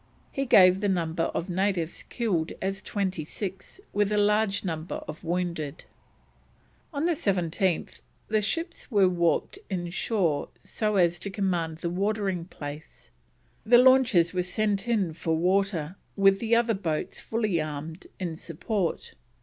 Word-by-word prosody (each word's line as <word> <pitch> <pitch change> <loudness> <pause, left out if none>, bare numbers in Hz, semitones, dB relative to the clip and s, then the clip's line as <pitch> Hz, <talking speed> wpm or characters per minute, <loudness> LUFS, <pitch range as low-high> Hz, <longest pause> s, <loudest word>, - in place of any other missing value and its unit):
He 275 0 -2
gave 185 -3 +7
the 205 - +1
number 165 -3 0
of 170 - -3
natives 185 -2 -1
killed 185 -9 -1
as 195 0 -2
twenty 190 -6 -2
six, 190 - -6
with 205 0 +1
a 210 - +2
large 210 0 +2
number 160 -1 -3
of 155 +1 -8
wounded. 170 -3 -3 1.1
On 290 0 -1
the 350 - +3
17th 185 - 0 0.3
the 215 0 +2
ships 330 - -3
were 200 -6 +4
warped 175 - +1
inshore 175 -3 -1
so 210 -1 -1
as 175 -3 +3
to 200 - -4
command 175 -5 -1
the 170 +1 -3
watering 195 -2 -1
place, 150 -2 -9 0.5
the 240 +2 +6
launches 245 -9 +5
were 180 - +1
sent 200 +3 0
in 205 -8 +1
for 160 0 -1
water, 185 -2 +1 0.2
with 195 -1 +4
the 230 +1 +2
other 235 -1 +3
boats 165 -6 -3
fully 215 -7 0
armed, 155 +3 -6
in 175 -4 -3
support. 175 +3 -3
190 Hz, 140 wpm, -27 LUFS, 170-210 Hz, 1.1 s, gave